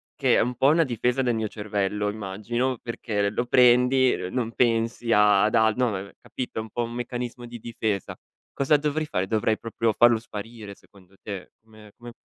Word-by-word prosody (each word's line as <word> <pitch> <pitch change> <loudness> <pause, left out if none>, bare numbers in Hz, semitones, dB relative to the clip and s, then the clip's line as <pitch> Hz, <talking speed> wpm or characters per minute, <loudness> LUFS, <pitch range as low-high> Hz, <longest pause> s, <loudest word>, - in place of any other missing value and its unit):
che - - +2
è - - +4
un 125 +2 -1
po' 135 - +3
una 160 +3 +5
difesa 125 0 0
del 120 -1 +1
mio 110 -1 -1
cervello 105 -1 -2
immagino 110 +5 -3
perché 105 -4 -2
l - - -12
lo 120 - -1
prendi, 125 +1 +4
n 90 - -5
non 120 -3 -1
pensi 115 0 0
ad 105 +1 +4
al 110 -1 +4
no, 125 -1 +1
ne 95 -2 -3
ne 100 - -14
capito, 125 -3 -5
un 110 - -9
po' 120 +2 -2
un 115 - -5
meccanismo 120 0 -5
di 120 - -8
difesa. 110 -4 -3 0.4
Cosa 140 +2 +3
dovrei 150 +1 -1
fare? 95 -9 -1
Dovrei 110 +1 +1
proprio 115 0 -1
farlo 120 +1 +5
sparire, 110 -2 -9
secondo 95 -1 -22
te? 100 -3 -7
Come 110 -1 -17
come 120 0 -10
115 Hz, 195 wpm, -25 LUFS, 105-125 Hz, 0.4 s, una